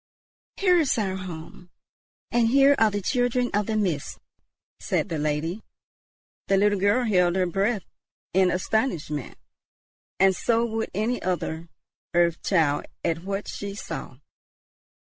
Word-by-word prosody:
"Here 360 -3 +4
is 295 -7 +1
our 195 -4 -1
home, 175 -1 -8 0.6
and 235 -1 +3
here 275 +3 +5
are 220 - +5
the 205 -1 -3
children 245 +1 +1
of 205 0 +1
the 220 -1 0
Mist," 175 -9 -1 0.6
said - - -1
the 160 - -2
lady. 155 +6 -1 0.9
The 195 - +3
little 205 0 +3
girl 205 +6 +2
held 180 -5 +3
her 185 -1 +2
breath 195 +3 0 0.5
in 185 0 +4
astonishment, 180 - -1 0.8
and 190 0 +5
so 230 +4 +1
would 225 -1 -2
any 225 +5 0
other 170 -2 -3 0.5
earth 170 -1 +3
child 160 -6 +1 0.2
at 165 0 -1
what 200 +1 -3
she 200 -1 -5
saw. 135 -9 -7
195 Hz, 135 wpm, -25 LUFS, 175-225 Hz, 0.9 s, here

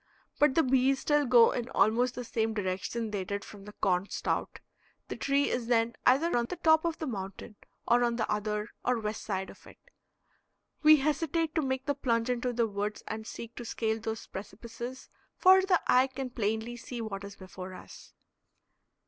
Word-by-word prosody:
But 290 -3 +4
the 325 - +5
bees 265 +1 +3
still 295 0 +2
go 235 -2 +7
in 245 0 -3
almost 245 +3 +2
the 250 - -4
same 225 -1 -1
direction 205 +3 -2
they 200 -2 -2
did 200 +2 -4
from 200 -2 -12
the 210 - -10
corn 185 -1 0
stout. - - -2 0.5
The - - -3
tree 280 +1 +1
is 240 -2 -2
then 235 -1 +2
either 285 +7 +4
on 240 -1 +2
the 360 - -5
top 320 -1 +4
of 335 -1 -1
the 315 - -4
mountain 200 -2 -6 0.3
or 240 +1 +4
on 235 -1 +1
the 220 -2 -1
other 210 +1 -2
or 250 0 +1
west 215 -1 -4
side 190 -2 -3
of - - -18
it. - - -15 1.0
We 310 0 +8
hesitate 310 +2 0
to 320 - +1
make 265 -1 -2
the 285 - +1
plunge 235 -3 0
into 250 0 -1
the 235 -1 +1
woods 205 0 -4
and 220 0 -5
seek 235 0 -8
to 240 - -5
scale 220 -1 -2
those 220 0 -5
precipices, 230 +6 -8 0.3
for 375 +1 +7
the 375 -2 +3
eye 255 +1 +5
can 265 -1 -6
plainly 225 +1 -2
see 240 +1 -7
what 200 -3 -5
is 200 0 -8
before 185 -1 -9
us. - - -13
235 Hz, 190 wpm, -30 LUFS, 210-265 Hz, 1.0 s, We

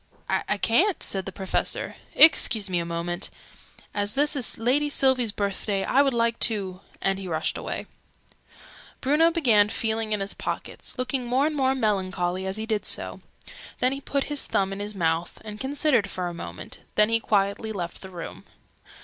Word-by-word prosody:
"I 210 - 0
ca'n't," 335 - +2
said 195 -1 -3
the - - -4
Professor. 190 0 -2 0.2
"Excuse 220 - +7
me 175 - +1
a 170 - -3
moment. 170 +2 -3 0.6
As 205 0 0
this 295 +2 +3
is 255 -5 +1
Lady 265 +6 +2
Sylvie's 260 -5 +3
birthday, 200 -1 -2
I 270 - +3
would 275 -3 +2
like 230 0 +1
to 195 -5 +1
" - - -27
and 195 0 +1
he 190 - -6
rushed 160 -2 -1
away. - - -4 1.1
Bruno 300 +5 +4
began 235 -12 +4
feeling 220 0 -1
in 210 - 0
his 195 0 -2
pockets, - - -5
looking 255 0 -2
more 255 +4 +2
and 310 0 -1
more 265 -1 +2
melancholy 190 -5 -1
as 190 +2 -2
he 220 - -3
did 215 -2 -1
so: - - -2 0.6
then 255 - +2
he 275 +1 -4
put 280 0 -1
his 295 -2 -2
thumb 195 0 0
in 195 - -6
his 205 +1 -5
mouth, 165 -1 -1
and 210 0 -7
considered 270 -6 +1
for 180 -2 -3
a 175 - -5
minute: 170 - -8 0.2
then 210 +1 +4
he 230 0 +3
quietly 205 +1 0
left 175 -5 -5
the 190 - -9
room. 175 -3 -8
215 Hz, 185 wpm, -25 LUFS, 190-260 Hz, 1.1 s, Excuse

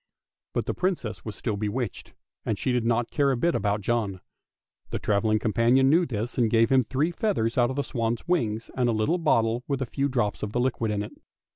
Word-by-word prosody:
But - - -1
the - - -1
Princess 120 - -2
was 110 -2 -6
still 110 -4 -3
bewitched, 105 +1 -4 0.3
and 110 - -1
she 130 - -1
did 125 -2 +1
not 120 0 +1
care 140 -2 +2
a 130 - +1
bit 170 +7 +1
about 105 0 0
John; 105 -3 -1 0.7
the - - -2
travelling 110 +1 +1
companion 120 +5 +3
knew 170 +2 +4
this, 115 +2 -3
and 115 -2 +3
gave 115 +1 +3
him 130 -1 +5
three 135 +9 0
feathers 170 - 0
out 120 -1 +3
of 130 - -3
the 140 - 0
swan's 115 +2 -2
wings 115 -11 0
and 125 -1 +1
a - - +2
little 110 +12 +1
bottle 115 -6 +2
with 140 -2 -1
a 135 - -1
few 140 +4 -1
drops 120 -6 -1
of 105 +1 -4
liquid 120 -2 0
in 105 -1 -1
it. 105 - -9
120 Hz, 220 wpm, -26 LUFS, 110-135 Hz, 0.7 s, him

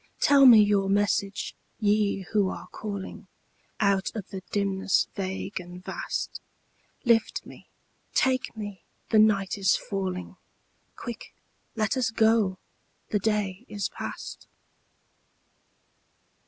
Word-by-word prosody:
Tell 280 -1 +7
me 235 -3 +10
your 200 -2 +2
message, 200 0 0 0.3
Ye 205 -2 +2
who 205 -3 +3
are - - -6
calling 200 -3 -6 0.5
Out 200 -2 +2
of 205 -4 -5
the 190 - -5
dimness 195 -1 +1
vague 190 0 -4
and 180 0 -10
vast; - - -4 0.6
Lift 230 -2 +2
me, - - -13 0.5
take 255 -3 +1
me, 205 -4 -6 0.3
the 220 - +6
night 205 -2 +3
is 190 -1 +4
falling; 185 -2 -4 0.6
Quick, 235 -1 -8 0.4
let 215 -3 +1
us 255 -3 +1
go, 220 -4 +3 0.5
the 210 - +1
day 200 -2 -1
is 205 -1 -2
past. - - -7
205 Hz, 115 wpm, -27 LUFS, 195-220 Hz, 0.6 s, me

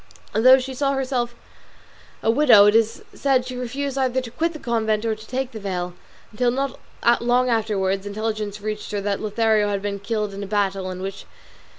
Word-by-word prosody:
Although 255 +4 +7
she 265 0 -4
saw 275 +1 0
herself 255 -3 -1 0.9
a 225 - +4
widow, 230 -6 +7
it 210 - +5
is 225 0 +2
said 265 -3 +1
she 255 0 -6
refused 270 +3 -3
either 260 -1 +1
to 250 -3 -7
quit 330 +6 0
the 320 - -8
convent 225 -4 0
or 225 - +1
take 250 +4 -4
the 220 - -7
veil, 180 -3 -3 0.4
until, 240 +3 +1
not 270 +2 -2 0.4
long 245 +1 +2
afterwards, 200 -4 0
intelligence 210 0 -3
reached 215 0 -4
her 205 - -1
that 200 0 -1
Lothario 215 -1 +2
had 200 -1 -2
been 200 -1 -3
killed 210 -1 -2
in 200 - -6
a 200 - -5
battle 195 -2 0
in 185 0 -6
which 195 0 -5
M. - - -18
225 Hz, 195 wpm, -23 LUFS, 205-255 Hz, 0.9 s, Although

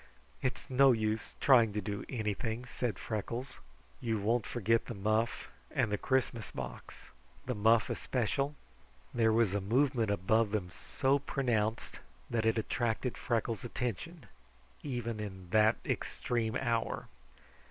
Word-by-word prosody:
"It's 130 - -2
no 135 0 +6
use 110 -1 -1
trying 120 -6 +6
to 105 - -1
do 100 +1 -4
anything," 110 0 -2
said 120 -1 -2
Freckles. 115 +4 -4 0.4
"You 115 -2 -1
won't 115 +2 +1
forget 115 0 +1
the 120 - -5
muff 110 +4 0 0.2
and 105 - 0
the 105 - +1
Christmas 130 -4 0
box. 60 -2 -8 0.4
The 125 - -1
muff 110 +1 +4
especial?" 135 +4 -1 0.6
There 115 -2 +3
was 110 -3 +3
a 100 - 0
movement 120 +2 +2
above 105 +3 +2
them 100 -4 -2
so 135 +8 0
pronounced 115 -6 -1 0.3
that 115 -2 +1
it 110 - +3
attracted 115 +2 -1
Freckles' 115 -4 -1
attention, 125 - -4 0.6
even 120 -5 -3
in 95 -4 -7
that 110 +1 +5
extreme 115 -3 -1
hour. 115 -3 -1
115 Hz, 130 wpm, -33 LUFS, 105-125 Hz, 0.6 s, no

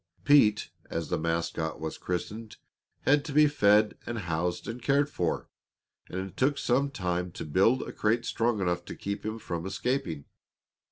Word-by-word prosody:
Pete, 110 -7 +5 0.2
as 80 -1 -3
the 85 - 0
mascot 80 -1 -2
was 80 0 -5
christened, 105 +5 -4 0.4
had 145 +1 +3
to 155 - -5
be 150 +1 +7
fed 105 -7 +3
and 120 - -3
housed 90 -2 -2
and 115 +2 -5
cared 140 +3 +2
for, 85 - -1 0.6
and 95 - -4
it - - -28
took 140 +5 +2
some 135 +3 +1
time 90 -8 -2
to - - -6
build 95 - +3
a - - -7
crate 115 +2 +1
strong 115 -2 0
enough 90 -1 0
to - - -7
keep 100 0 -4
him 110 +1 -3
from 85 -6 -4
escaping. 95 - -2
105 Hz, 170 wpm, -29 LUFS, 85-125 Hz, 0.6 s, be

